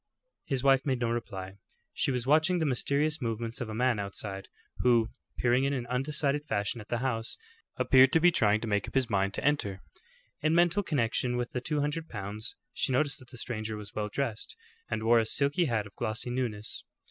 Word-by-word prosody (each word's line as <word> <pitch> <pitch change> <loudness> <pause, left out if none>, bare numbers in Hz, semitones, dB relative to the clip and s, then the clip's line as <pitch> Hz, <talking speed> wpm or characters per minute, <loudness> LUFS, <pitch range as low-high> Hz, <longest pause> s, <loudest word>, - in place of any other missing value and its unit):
His 135 -3 -1
wife 135 -1 +5
made 130 -3 0
no 120 -1 0
reply. 100 -5 -5 0.3
She - - 0
was 125 -2 -1
watching 160 +6 +4
the 160 - +1
mysterious 145 +3 +1
movements 115 +2 -3
of 120 - -3
a 110 - -5
man 125 -1 +2
outside, 100 0 -4 0.3
who, 120 -2 +4 0.3
peering 125 +2 +3
in 140 +1 +1
an 125 -3 -2
undecided 140 +3 0
fashion 100 +1 -1
at 105 - -13
the 120 - -1
house, 115 -3 -1 0.4
appeared 130 0 +6
to 165 - +6
be 175 +2 +6
trying 105 -7 +3
to 115 - -3
make 105 -2 0
up - - -10
his 130 -3 +1
mind 100 0 +1
to - - -3
enter. 105 -10 0 0.6
In 155 +1 +2
mental 175 +3 +4
connection 125 - 0
with 120 0 -2
the 125 - -3
two 150 +2 -1
hundred 155 +3 -2
pounds, 105 +1 -5 0.2
she - - 0
noticed 145 +3 +1
that 130 -2 -16
the 125 - -10
stranger 110 -2 -4
was 105 0 -9
well 105 -1 -2
dressed, 115 -2 -3 0.3
and 110 0 -2
wore 115 +1 +5
a 110 - +1
silk 140 +4 +2
hat 120 - +2
of 100 - -13
glossy 120 +2 -3
newness. 115 -4 -3
120 Hz, 205 wpm, -30 LUFS, 110-140 Hz, 0.6 s, appeared